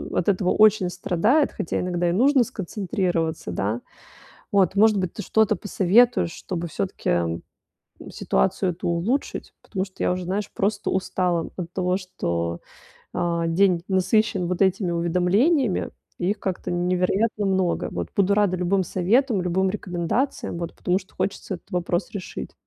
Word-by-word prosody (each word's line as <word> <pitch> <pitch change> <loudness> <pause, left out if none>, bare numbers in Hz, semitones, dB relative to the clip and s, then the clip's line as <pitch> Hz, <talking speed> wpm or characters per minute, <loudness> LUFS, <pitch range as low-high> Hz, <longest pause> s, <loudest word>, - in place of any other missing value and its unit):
от 175 - 0
этого 185 -1 +2
очень 215 -4 +4
страдает, 200 - +1
хотя - - -2
иногда 175 -1 0
и - - 0
нужно 260 +4 +4
сконцентрироваться, 185 - -2
да. 105 +6 -1 0.7
Вот, 195 0 +3
может 215 0 +5
быть, 185 -2 -2
ты 210 - -5
что-то 220 0 +2
посоветуешь, 205 +1 +3
чтобы 175 -2 -5
всё-таки 85 - -1 0.7
ситуацию 120 - 0
эту 175 +1 -4
улучшить, 195 +12 -2
потому 190 -2 -3
что 190 - -9
я - - +2
уже, 180 0 -3
знаешь, 200 +3 -2
просто 205 -1 -1
устала 180 -3 0
от 175 -2 -6
того, 180 0 0
что, 85 - -3 0.5
а, 170 -1 0
день 175 0 +3
насыщен 190 0 +2
вот 180 +2 0
этими 190 -2 +1
уведомлениями 180 - +2 0.3
и 180 +2 0
их 210 - -2
как-то 185 -2 -3
невероятно 180 +5 0
много, 190 -2 0
вот. - - -4
Буду 200 0 +3
рада 205 -3 +2
любым 185 +1 +1
советам, 210 - +1
любым 185 +2 +1
рекомендациям, 185 +3 -2
вот, 170 -1 -5
потому 180 +1 +1
что 190 - -19
хочется 195 -1 -3
этот 175 - -12
вопрос 175 0 -1
решить. 200 -3 -6
185 Hz, 150 wpm, -24 LUFS, 175-205 Hz, 0.7 s, может